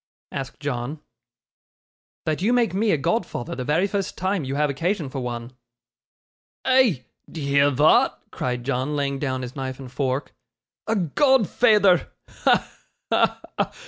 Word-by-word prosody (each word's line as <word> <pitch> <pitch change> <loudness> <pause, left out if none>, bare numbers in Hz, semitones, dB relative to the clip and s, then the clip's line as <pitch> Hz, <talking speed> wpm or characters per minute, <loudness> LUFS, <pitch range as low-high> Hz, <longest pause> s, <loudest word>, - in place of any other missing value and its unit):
asked 135 -1 -5
John. 140 +1 -3 1.3
'That 155 +1 -1
you 225 +6 +2
make 235 -7 +2
me 210 +3 +1
a 160 - +3
godfather 155 - -2
the 130 - -4
very 155 +8 +2
first 200 -1 -3
time 185 -2 0
you 135 +1 -3
have 150 +1 +2
occasion 165 +3 -1
for 135 - -4
one.' 120 -1 -5 1.1
'Eh! 255 - +4 0.3
d'ye 150 -4 -5
hear 140 +1 +4
thot?' 145 +4 +4
cried 125 -1 -3
John, 135 +3 -1
laying 140 -1 -1
down 130 -2 -2
his 125 0 -7
knife 130 -2 -4
and 130 -2 -9
fork. 130 +1 -2 0.5
'A 225 - +1
godfeyther! 210 - +3 0.2
Ha! - - +2 0.4
ha! - - +2 0.2
ha! - - +1
145 Hz, 145 wpm, -23 LUFS, 130-195 Hz, 1.3 s, Eh